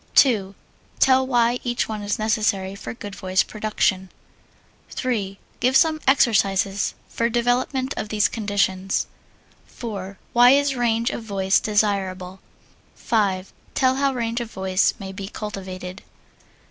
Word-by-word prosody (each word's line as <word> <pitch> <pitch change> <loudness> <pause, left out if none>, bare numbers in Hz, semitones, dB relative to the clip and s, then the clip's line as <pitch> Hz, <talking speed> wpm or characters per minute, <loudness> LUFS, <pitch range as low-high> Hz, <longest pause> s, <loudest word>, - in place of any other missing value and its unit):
2. 205 -7 +4 0.4
Tell 260 0 +4
why 240 -1 +2
each 240 -1 -1
one 215 -1 -4
is 205 0 -2
necessary 210 -3 0
for 200 - -7
good 205 -4 -8
voice 185 -1 +1
production. 210 -3 -1 0.8
3. 205 -6 -2 0.2
Give 255 +2 +4
some 315 0 +3
exercises 200 -6 +2
for 230 0 -1
development 250 +3 0
of 210 - -4
these 210 -1 +2
conditions. 195 -3 0 0.6
4. 200 -5 -7 0.2
Why 245 +1 +7
is 285 -1 +1
range 235 -1 +1
of - - -5
voice 195 -3 +1
desirable? 195 -3 -1 0.6
5. 195 -4 -1 0.2
Tell 260 -1 +2
how 275 0 +2
range 235 -1 -2
of 235 - -5
voice 190 -2 +1
may 195 -1 -7
be 195 0 -7
cultivated. 190 -3 -7
210 Hz, 130 wpm, -23 LUFS, 195-240 Hz, 0.8 s, Why